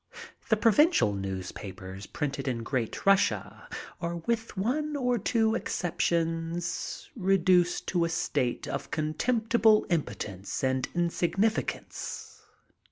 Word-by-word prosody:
*'The 220 - +4
provincial 230 - +4
newspapers 95 0 -6
printed 140 -1 -3
in 120 -3 -1
Great 120 -2 -2
Rus 195 0 +7
sia - - -7 0.3
are 170 -1 -2
with 225 +5 -2
one 295 +9 0
or 250 -3 +1
two 220 +1 +2
exertions 165 -3 -1
reduced 185 -3 +3
to 175 -2 +2
a - - -1
state 140 -6 -1
of - - -4
contemptible 220 +7 +2
in4x>tence 105 - -2
and 130 0 +1
insignificance. 175 +5 -1
170 Hz, 105 wpm, -29 LUFS, 135-220 Hz, 0.3 s, Rus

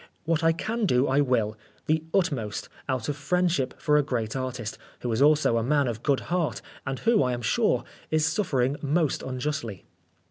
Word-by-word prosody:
What 165 0 +1
I 165 - +5
can 220 +6 -1
do 125 -2 +3
I 135 +2 +3
will 115 -6 +1 0.3
the 155 +1 +2
utmost 140 - -1 0.2
out 130 -3 -1
of 145 - -1
friendship 145 -2 0
for 150 -2 +3
a - - +5
great 120 -6 -2
artist, 125 -4 -4 0.2
who 120 - -2
is 110 +3 0
also 145 -5 +4
a - - -1
man 140 +2 +2
of 115 -2 -3
good 140 -1 +1
heart, 175 -2 -1 0.3
and 135 0 -2
who, 230 - +3
I 125 -2 +1
am 120 0 -4
sure, - - +2 0.3
is 155 -1 +2
suffering 145 -6 +1
most 155 +1 +1
unjustly." 130 -5 -4
140 Hz, 185 wpm, -26 LUFS, 125-155 Hz, 0.3 s, I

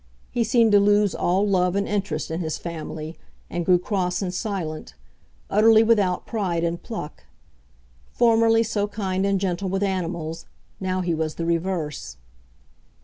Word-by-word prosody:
He 240 - +1
seemed 230 0 +3
to 205 - +7
lose 205 0 +3
all 190 +4 +1
love 180 -2 +2
and 200 0 0
interest 180 -8 -2
in 165 - -2
his 160 -3 -2
family, 160 -1 -6 0.3
and 175 - -2
grew 180 +1 +5
cross 180 -1 -1
and 180 -1 -3
silent, 180 -6 -4 0.5
utterly 220 +2 +5
without 205 -5 +2
pride 185 -7 -1
and 170 0 -1
pluck. 220 -10 -7 0.9
Formerly 230 -1 +4
so 210 -2 -1
kind 195 -2 -1
and 200 -1 +1
gentle 185 0 -2
with 195 +2 -1
animals, 170 -4 -3 0.3
now 185 -1 -1
he 175 -2 0
was 160 -1 -2
the 165 - -3
reverse. 165 - -2
185 Hz, 150 wpm, -24 LUFS, 170-205 Hz, 0.9 s, to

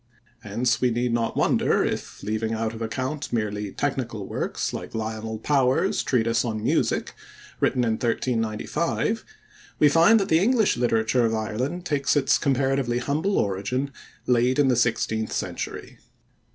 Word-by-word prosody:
Hence 120 +3 -1
we 125 - +3
need 120 +1 0
not 115 -1 -1
wonder - - +2
if, - - -4
leaving 110 +2 -1
out 110 0 -2
of 115 - -8
account 130 +6 -3
merely 105 -3 -2
technical 120 -7 -3
works - - -3
like - - -6
Lionel 110 0 -4
Power's 135 - +2
treatise 115 -2 +1
on 110 -3 -3
music, - - 0 0.5
written 125 -1 +2
in 115 - +1
1395, 120 - -1 0.5
we 150 - +5
find 165 +9 +6
that 195 - -1
the 160 - +4
English 225 +2 +3
literature 120 0 +2
of 110 - -1
Ireland 125 +11 -3
takes 145 -3 +1
its 145 - +3
comparatively 135 -2 +1
humble 150 +10 0
origin 115 +8 -1 0.3
late 125 +1 +2
in 145 -2 +4
the 125 - +3
sixteenth 110 -2 0
century. - - -5
120 Hz, 145 wpm, -25 LUFS, 110-140 Hz, 0.5 s, find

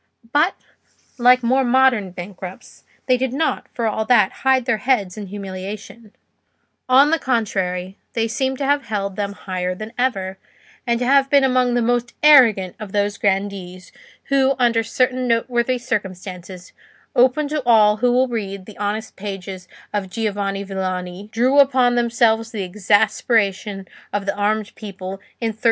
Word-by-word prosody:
But, 310 +6 +3 0.6
like 250 +1 +5
more 260 +3 +2
modern 250 -5 +3
bankrupts, 180 +1 -10 0.2
they 255 -1 +3
did 255 0 -2
not, 315 +4 -1
for 235 - -3
all 220 0 0
that, 215 -5 +4
hide 265 -2 +3
their 240 -4 0
heads 215 -8 0
in 210 -2 -7
humiliation; 200 +3 -8 0.8
on 275 +4 +6
the 330 - +2
contrary, 190 -6 -2
they 225 -1 0
seemed 265 +3 -2
to 275 - -2
have 285 0 +1
held 200 -2 -3
them 200 0 -3
higher 185 -2 -4
than 215 +4 -8
ever, 195 -7 -1 0.5
and 235 0 +1
to - - +1
have 275 +1 +4
been 280 -1 +4
among 255 -2 +2
the 240 - +1
most 240 0 -1
arrogant 230 -11 +6
of 210 -3 -8
those 205 0 0
grandees, 190 -2 -2 0.4
who 275 -1 +3
under 235 -3 +2
certain 255 +2 0
noteworthy 240 +1 +1
circumstances, 185 -6 -6 0.4
open 260 +4 +3
to 305 0 -1
all 215 -3 +5
who 245 +2 +2
will 255 +2 +3
read 200 -5 -5
the 210 -1 -13
honest 210 +2 -3
pages 190 -2 -7 0.3
of 200 -2 -2
Giovanni 200 -2 -2
Villani, 185 0 -5
drew 255 +5 +3
upon 260 -3 +4
themselves 230 -1 +2
the 210 -4 -4
exasperation 205 0 0 0.2
of 205 -1 -2
the 200 - -1
armed 210 +1 -1
people 195 -2 -8 0.2
in 230 - -1
1343. 220 0 -8
220 Hz, 155 wpm, -20 LUFS, 195-250 Hz, 0.8 s, on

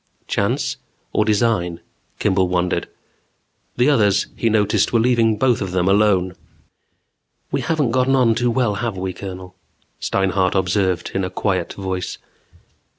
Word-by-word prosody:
Chance - - -1 0.4
or 105 - +2
design? 105 -6 +1 0.4
Kimball 95 -2 +1
wondered. 90 -1 0 0.9
The 125 +4 +4
others, 105 -8 +3
he 115 - 0
noticed, 105 -1 +2
were 115 - +3
leaving 115 -2 +2
both 125 -1 +2
of 95 -2 -3
them 90 0 +1
alone. 95 -2 +3 1.2
"We - - 0
haven't 150 -7 0
gotten 130 +2 +2
on 125 -3 +4
too 120 +2 0
well, 120 -3 +1
have 115 -5 -2
we, 95 0 -3
Colonel?" 90 0 -8 0.5
Steinhart 95 -1 0
observed 95 -1 0
in 95 - -1
a 90 - -2
quiet 95 -3 -1
voice. 95 -2 -4
100 Hz, 140 wpm, -20 LUFS, 95-115 Hz, 1.2 s, The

